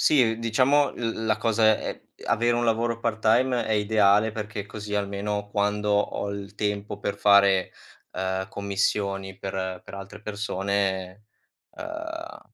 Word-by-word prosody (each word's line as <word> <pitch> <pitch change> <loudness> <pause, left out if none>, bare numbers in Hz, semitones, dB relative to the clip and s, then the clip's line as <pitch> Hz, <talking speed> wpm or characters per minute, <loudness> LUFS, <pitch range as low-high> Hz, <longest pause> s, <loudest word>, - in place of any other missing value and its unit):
Sì, 115 -6 +4
diciamo 130 +5 +3
l 115 -1 -3
la 110 - +2
cosa 115 0 +2
è - - -5 0.2
è - - -12
avere 120 +1 +2
un 120 - +1
lavoro 115 +1 +1
part-time 115 +3 +2
è - - -4
ideale 105 0 +3
perché 105 -2 -5
così 105 0 -7
almeno 100 0 -2
quando 105 +1 0
ho 100 0 0
il 100 0 -7
tempo 105 -1 -2
per 100 0 -3
fare, 100 -2 +5 0.4
eh, 95 0 -2
commissioni 100 -1 -1
per 95 -1 -4
per - - -10
altre 100 +1 -9
persone, 100 -2 -2 0.5
eh, 325 +1 -6
105 Hz, 140 wpm, -26 LUFS, 100-115 Hz, 0.5 s, fare